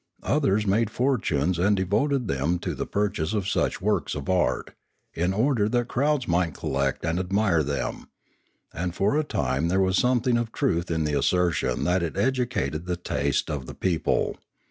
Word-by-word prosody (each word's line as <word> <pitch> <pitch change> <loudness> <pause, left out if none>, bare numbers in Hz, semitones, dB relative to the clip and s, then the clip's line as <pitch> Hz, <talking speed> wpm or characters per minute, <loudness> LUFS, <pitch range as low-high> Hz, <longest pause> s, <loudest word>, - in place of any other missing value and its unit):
Others 120 -8 +1
made 105 +3 +2
fortunes 95 - 0
and 100 +3 +3
devoted 115 +7 +1
them 75 +5 0
to - - -4
the - - -4
purchase 100 -4 -1
of 100 -3 -1
such - - 0
works - - 0
of 75 +4 -3
art, 90 -1 0 0.4
in 90 +3 0
order 110 0 +2
that 120 +1 0
crowds 140 0 +1
might 85 -3 +1
collect 70 +1 -1
and 80 +2 0
admire 95 -2 +2
them, 70 -2 -3 0.6
and 90 +1 -3
for 100 +9 +1
a 155 - +2
time 75 - -1
there 95 +3 +1
was 95 0 +2
something 125 -1 +2
of 115 -1 -3
truth 85 - 0
in 80 -1 0
the 75 -1 -1
assertion 90 +4 +1
that 90 +1 +2
it 85 -2 -3
educated 120 - -1
the 90 -1 -1
taste 90 - -1
of 70 -4 -4
the - - -8
people. 90 -4 0
95 Hz, 175 wpm, -25 LUFS, 85-120 Hz, 0.6 s, and